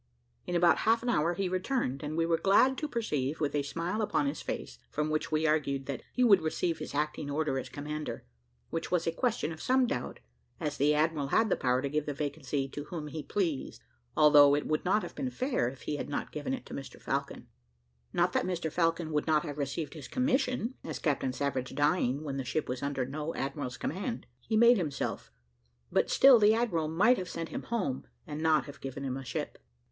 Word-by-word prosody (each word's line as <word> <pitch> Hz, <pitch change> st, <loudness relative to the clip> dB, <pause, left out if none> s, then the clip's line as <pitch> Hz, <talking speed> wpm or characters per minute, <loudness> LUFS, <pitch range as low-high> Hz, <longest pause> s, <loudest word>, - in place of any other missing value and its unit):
In 175 Hz, -, -2 dB
about 170 Hz, 0 st, +5 dB
half 225 Hz, +1 st, +2 dB
an 245 Hz, -, -1 dB
hour 170 Hz, -5 st, +2 dB
he 195 Hz, +1 st, -1 dB
returned, 185 Hz, -, -1 dB
and 155 Hz, +1 st, -4 dB
we 165 Hz, -, +2 dB
were 165 Hz, -1 st, +1 dB
glad 255 Hz, +7 st, +5 dB
to 305 Hz, -, -2 dB
perceive, 155 Hz, -, -2 dB
with 145 Hz, -2 st, 0 dB
a 145 Hz, -, +2 dB
smile 165 Hz, +9 st, -2 dB
upon 210 Hz, +6 st, +1 dB
his 280 Hz, -, -2 dB
face, -, -, -5 dB
from 150 Hz, 0 st, -1 dB
which 155 Hz, +1 st, -1 dB
we 155 Hz, +1 st, +1 dB
argued 140 Hz, -3 st, +1 dB
that 135 Hz, -3 st, -4 dB
he 250 Hz, -, +1 dB
would 200 Hz, -7 st, +6 dB
receive 160 Hz, +1 st, -1 dB
his -, -, -6 dB
acting 150 Hz, 0 st, -1 dB
order 145 Hz, -2 st, 0 dB
as -, -, -7 dB
commander, 150 Hz, -, -5 dB, 0.5 s
which 165 Hz, -, -3 dB
was 175 Hz, -2 st, +1 dB
a 165 Hz, -, +1 dB
question 220 Hz, -4 st, -1 dB
of 160 Hz, -, -8 dB
some 260 Hz, 0 st, +3 dB
doubt, -, -, -3 dB, 0.4 s
as 150 Hz, -1 st, -3 dB
the 150 Hz, +2 st, +3 dB
admiral 155 Hz, -2 st, +1 dB
had 220 Hz, +9 st, +3 dB
the -, -, +5 dB
power 125 Hz, +1 st, +1 dB
to -, -, 0 dB
give 150 Hz, +1 st, -1 dB
the 145 Hz, -, -2 dB
vacancy 140 Hz, -2 st, -2 dB
to 145 Hz, +2 st, -6 dB
whom 155 Hz, -2 st, -6 dB
he 155 Hz, +1 st, -5 dB
pleased, 165 Hz, -5 st, -2 dB, 0.3 s
although 145 Hz, -1 st, +7 dB
it 145 Hz, -, -1 dB
would 155 Hz, 0 st, 0 dB
not 200 Hz, +4 st, +2 dB
have -, -, -7 dB
been 265 Hz, -2 st, -3 dB
fair 250 Hz, -, 0 dB
if 135 Hz, +1 st, -12 dB
he 150 Hz, -, -2 dB
had -, -, -5 dB
not 145 Hz, -, -3 dB
given 150 Hz, -, -4 dB
it 260 Hz, -2 st, -3 dB
to -, -, -10 dB
Mr 135 Hz, -, -7 dB
Falcon; -, -, -3 dB, 0.6 s
not 175 Hz, +1 st, +2 dB
that -, -, +1 dB
Mr 175 Hz, -3 st, -2 dB
Falcon 165 Hz, -1 st, +1 dB
would 150 Hz, 0 st, 0 dB
not 155 Hz, 0 st, +3 dB
have 150 Hz, -3 st, -6 dB
received 145 Hz, +3 st, -3 dB
his 150 Hz, -6 st, -8 dB
commission, 255 Hz, -2 st, 0 dB
as -, -, -4 dB
Captain 140 Hz, -4 st, 0 dB
Savage 130 Hz, -1 st, -2 dB
dying 145 Hz, -2 st, +1 dB
when 140 Hz, -3 st, -4 dB
the 135 Hz, -, -2 dB
ship 135 Hz, +5 st, -2 dB
was 125 Hz, 0 st, -3 dB
under 140 Hz, -2 st, -1 dB
no 150 Hz, +4 st, -4 dB
admiral's 135 Hz, -2 st, -3 dB
command, 200 Hz, -, -3 dB
he 220 Hz, -, -1 dB
made 235 Hz, +2 st, +7 dB
himself; 155 Hz, -7 st, -3 dB, 0.6 s
but -, -, +2 dB
still 265 Hz, -3 st, +7 dB
the 215 Hz, +1 st, +6 dB
admiral 185 Hz, -10 st, 0 dB
might 205 Hz, +11 st, +4 dB
have 180 Hz, -, -5 dB
sent 165 Hz, -1 st, -4 dB
him -, -, -4 dB
home, 190 Hz, -, -2 dB, 0.2 s
and 150 Hz, +1 st, -5 dB
not 155 Hz, -4 st, +3 dB
have 145 Hz, -, -11 dB
given 135 Hz, +1 st, -5 dB
him 130 Hz, -1 st, -2 dB
a 135 Hz, -, -5 dB
ship. -, -, -4 dB
155 Hz, 220 wpm, -30 LUFS, 145-185 Hz, 0.6 s, although